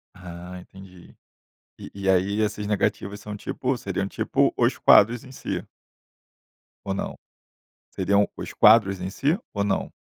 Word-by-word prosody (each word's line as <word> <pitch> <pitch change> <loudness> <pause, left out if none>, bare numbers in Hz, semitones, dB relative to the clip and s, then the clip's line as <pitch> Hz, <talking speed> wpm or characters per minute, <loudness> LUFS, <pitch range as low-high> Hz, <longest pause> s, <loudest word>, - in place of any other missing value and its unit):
Ah, 90 0 -9
entendi. 95 -1 -15 0.6
E - - -10
e 95 -1 -2
aí 95 +3 +2
essas 105 -1 -2
negativas 100 0 -1
são, 105 0 -7
tipo, 125 +4 -3
seriam, 100 -4 -3
tipo, - - 0
os - - +2
quadros 115 +4 +5
em 130 - -13
si. - - -5 1.2
Ou 95 - -2
não? - - -4 0.7
Seriam 100 +2 +1
os - - -7
quadros 105 -4 +5
em 95 - -3
si 145 - 0 0.2
ou 100 -1 -1
não? 100 - -1
100 Hz, 145 wpm, -24 LUFS, 95-105 Hz, 1.2 s, quadros